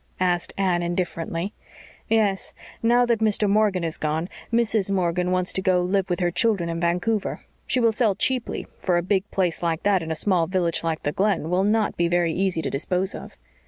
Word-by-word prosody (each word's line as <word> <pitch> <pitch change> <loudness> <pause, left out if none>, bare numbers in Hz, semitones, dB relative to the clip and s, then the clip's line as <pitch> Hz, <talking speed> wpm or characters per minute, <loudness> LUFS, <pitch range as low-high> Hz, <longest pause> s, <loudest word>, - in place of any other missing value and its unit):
asked 180 -1 0
Anne 185 -3 +1
indifferently. 175 +1 -3 0.6
"Yes. 210 -4 +1 0.3
Now 240 +2 +4
that 235 -2 +1
Mr. 215 -1 +2
Morgan 200 -3 +2
has 165 -1 -2
gone, 155 +3 -1 0.2
Mrs. 220 -4 +2
Morgan 180 -2 0
wants 185 0 +1
to 190 - 0
go 180 -1 +2
to - - -2
live 195 -1 +1
with 180 +1 -1
her 175 0 +1
children 185 -2 +1
in 165 0 -3
Vancouver. 180 +5 -1 0.2
She 255 - +2
will 230 -2 +4
sell 220 -3 +2
cheaply, 250 +3 -1
for 180 -2 +1
a 175 - 0
big 195 +2 0
place 180 -3 -1
like 165 -2 -1
that 200 -2 +3
in 160 - -6
a 160 - -1
small 175 -1 +2
village 175 -3 0
like 165 -1 -2
the 145 - 0
Glen 190 -3 0
will 185 +2 +2
not 215 +1 +1
be 170 - +2
very 175 -1 +1
easy 185 -3 0
to - - -1
dispose 180 +7 0
of." - - -9
185 Hz, 205 wpm, -24 LUFS, 170-205 Hz, 0.6 s, Now